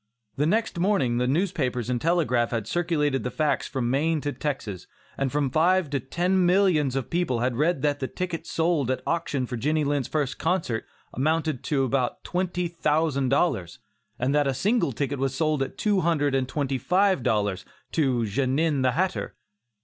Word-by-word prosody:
The 150 +2 +1
next 215 -1 0
morning 170 -11 +2
the 125 - +1
newspapers 135 - 0
and 125 -1 -1
telegraph 150 -9 +2
had 115 -3 -2
circulated 150 -2 0
the 125 - -2
facts 150 +1 0
from 125 -3 -2
Maine 155 +4 +1
to 145 - -2
Texas, 110 - -4 0.3
and 135 -2 -1
from 145 -2 0
five 175 +1 +2
to 140 - 0
ten 180 +8 0
millions 175 -7 +3
of 135 -3 -3
people 160 -9 0
had 125 0 0
read 150 +2 +1
that 145 -1 +1
the 130 - -2
tickets 180 +1 -5
sold 160 -6 +1
at 130 - -1
auction 155 -6 -1
for 125 0 -5
Jenny 150 +6 +1
Lind's 145 -2 0
first 145 -4 -2
concert 160 -9 -1 0.3
amounted 155 -1 0
to 140 -3 +1
about 130 -1 -1
twenty 180 -1 -1
thousand 155 -4 0
dollars, 130 - 0 0.4
and 125 +3 0
that 145 -1 +3
a 135 - 0
single 205 - +1
ticket 140 +2 -2
was 135 0 -1
sold 155 -1 +1
at 135 - -3
two 205 -2 +2
hundred 150 -4 +1
and 135 -1 +1
twenty 135 -2 -1
five 185 - +2
dollars, 105 -5 0 0.3
to 130 -6 +1
"Genin, 135 +6 +1
the 130 -1 +2
hatter." 185 +5 -1
145 Hz, 180 wpm, -25 LUFS, 130-170 Hz, 0.4 s, millions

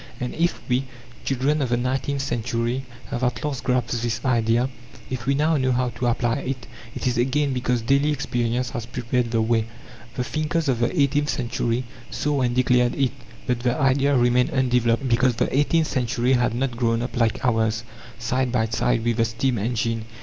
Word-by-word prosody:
And 125 0 -3
if 170 +2 0
we, 125 +1 +1 0.4
children 135 +3 +1
of 130 - 0
the 120 - +2
nineteenth 135 +3 -1
century, 120 +1 -1 0.3
have 120 - -2
at 125 +1 -1
last 140 -4 -3
grasped 125 -2 0
this 120 -1 -1
idea, 120 0 +2 0.4
if 125 -1 -4
we 140 - +3
know 155 +2 +2
now 130 -1 +1
how 125 0 +1
to 120 +1 -3
apply 120 0 +1
it, 130 -2 -4 0.3
it - - -4
is 125 -1 +1
again 135 +3 +1
because 125 -2 0
daily 140 +4 +3
experience 125 -3 -1
has 115 -1 -5
prepared 125 0 -1
the 115 -1 +1
way. 110 -1 +1 0.5
The 125 - -1
thinkers 155 +3 -1
of 125 -4 +1
the 120 +8 0
eighteenth 145 +1 +2
century 120 -1 -1 0.3
saw 145 -2 -1
and 120 -1 +1
declared 125 -1 +3
it, 135 -3 +1 0.3
but 125 -1 0
the 120 +2 0
idea 140 0 +3
remained 125 +1 +3
undeveloped, 125 -1 +1
because 120 0 +3
the 115 - 0
eighteenth 155 +3 +3
century 125 -1 0
had 120 -2 +2
not 125 -1 -1
grown 115 -1 +1
up 125 - -5
like 115 +1 +1
ours, 110 -2 +1 0.3
side 125 +2 -1
by 120 -3 +2
side 115 0 +1
with 120 -1 +1
the 115 - +3
steam 115 +1 0
engine. 115 0 -1
125 Hz, 190 wpm, -23 LUFS, 120-135 Hz, 0.5 s, we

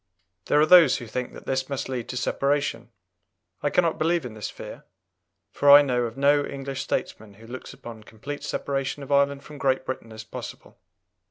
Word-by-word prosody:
There 150 - +3
are 150 - +6
those 175 0 +7
who 120 - -8
think 125 +3 -5
that - - -12
this 130 0 -2
must 140 -2 -3
lead 125 -3 -4
to 125 - -4
separation. 140 -2 -1 0.7
I 145 - +1
cannot 170 +1 +1
believe 165 -1 +1
in 120 - -7
this 110 -2 -5
fear, - - -10 0.7
for 145 - +2
I 145 +1 +10
know 125 -3 0
of 115 +1 -7
no 145 +1 +4
English 135 -1 -5
statesman 105 -6 -4
who 110 +2 -15
looks 125 +3 -8
upon 115 -2 -10
complete 140 +7 -8
separation 140 0 -3
of 140 - -9
Ireland 140 0 +2
from 150 -1 -11
Great 130 -1 +1
Britain 125 -3 -6
as 110 0 -8
possible. 110 - -10
135 Hz, 190 wpm, -25 LUFS, 120-145 Hz, 0.7 s, I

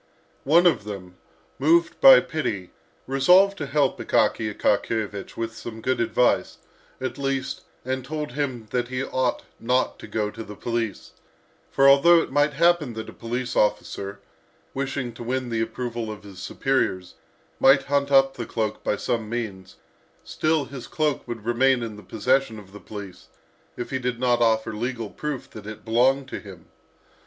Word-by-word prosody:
One 165 +6 +5
of 170 - +4
them, 95 -3 -8 0.4
moved 165 +4 +3
by 270 -1 +10
pity, 105 - -3 0.3
resolved 180 +10 +5
to 145 - -3
help 140 -2 +1
Akaky 110 -2 +1
Akakiyevich 105 -1 -1
with 115 0 -3
some 115 -1 -8
good 130 +3 -1
advice, 120 +1 +1 0.4
at 130 +2 -4
least, 135 -1 -2 0.2
and 130 0 -2
told 150 +1 -4
him 130 -4 -3
that 120 -1 0
he 130 +1 -3
ought 130 -2 -1 0.2
not 125 +2 0
to - - -9
go 105 -1 -2
to 115 +1 -8
the 105 - -10
police, 115 -2 -3 0.6
for 135 - +4
although 140 +5 +7
it 165 - -3
might 145 +1 +2
happen 165 -4 +2
that 110 0 -6
a - - -17
police 120 +2 -4
officer, 100 -1 -1 0.5
wishing 135 -2 -3
to 115 - -11
win 130 +1 -2
the 115 -1 -1
approval 120 -1 -4
of 105 -1 -9
his 100 -3 -12
superiors, 95 -4 -1 0.5
might 135 +1 +6
hunt 140 0 0
up 135 -1 +5
the 120 -3 -6
cloak 110 -2 -3
by - - +1
some 115 0 -2
means, 105 -6 -5 0.5
still, 155 -2 0
his 135 -3 -9
cloak 150 -3 -1
would 115 -3 -6
remain 120 +1 +3
in 110 -2 -5
the 105 - -11
possession 115 +4 0
of 100 -2 -13
the 105 - -9
police 100 -4 -10 0.5
if 120 - -5
he 130 - -1
did 125 -1 -2
not 125 -1 +2
offer 110 -1 +2
legal 115 -1 -4
proof 150 -4 -5
that 105 -1 -10
it 110 0 -9
belonged 130 +4 +2
to - - -5
him. 95 -5 -12
120 Hz, 170 wpm, -24 LUFS, 110-135 Hz, 0.6 s, by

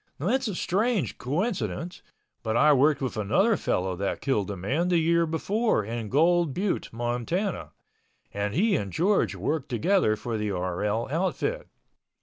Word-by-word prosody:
It's 245 - 0
a 205 - -3
strange 195 - 0
coincidence, 175 - -2 0.4
but 110 +1 -1
I 150 +4 +6
worked 140 +1 +3
with 125 -4 -3
another 190 - +2
fellow 95 - -1
that 100 +1 -2
killed 105 -8 0
a 100 - -4
man 135 - -1
the 180 -1 +3
year 170 +1 +2
before 195 - 0
in 115 -1 -4
Gold 165 - +3
Butte, 195 +1 -1
Montana, 120 - -2 0.6
and 100 +1 -2
he 200 +4 +3
and 100 - -2
George 165 - +1
worked 135 - -2
together 125 - +2
for 115 0 -4
the 105 0 -1
RL 100 +4 -1
outfit. 190 - -1
150 Hz, 150 wpm, -26 LUFS, -, 0.6 s, I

